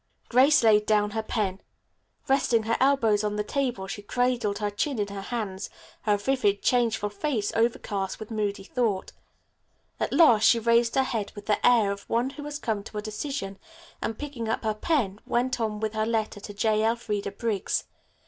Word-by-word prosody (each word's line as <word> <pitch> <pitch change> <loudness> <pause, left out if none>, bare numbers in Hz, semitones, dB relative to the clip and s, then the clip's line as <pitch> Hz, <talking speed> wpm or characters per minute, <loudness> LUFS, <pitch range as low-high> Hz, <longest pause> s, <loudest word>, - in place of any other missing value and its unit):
Grace 265 +3 +5
laid 210 -1 +5
down 210 -1 +2
her 220 +1 -1
pen. 200 -4 -2 0.7
Resting 250 -4 +2
her 230 +1 0
elbows 235 -6 +3
on 210 0 -1
the 210 - -1
table 245 -4 -2
she 200 +2 -6
cradled 240 -1 0
her 210 -1 -2
chin 265 +6 -1
in 205 -1 -1
her 200 -1 -6
hands, 200 -3 -4 0.3
her 210 -1 +2
vivid, 205 -3 +1
changeful 225 -4 +1
face 210 -1 -2
overcast 215 -4 -1
with 215 +1 -8
moody 205 -2 -2
thought. 215 -3 -1 0.9
At - - -1
last 270 -9 +6
she 235 - +6
raised 235 +1 +2
her 270 - +4
head 220 -5 -3
with 205 - -9
the 210 - 0
air 230 -5 +5
of 200 0 -7
one 240 +3 +1
who 290 +1 -9
has 295 0 -4
come 220 -8 -2
to 215 - -8
a - - -1
decision, 215 -2 -4 0.4
and, 225 - -3
picking 270 -7 -5
up 225 - -1
her 215 -1 +1
pen, 215 - 0
went 245 0 0
on 215 -2 -1
with 220 0 -2
her 215 0 0
letter 220 -2 -1
to 205 - -8
J. 215 +1 +2
Elfreda 220 -3 -1
Briggs. 210 -1 -1
220 Hz, 185 wpm, -26 LUFS, 205-240 Hz, 0.9 s, last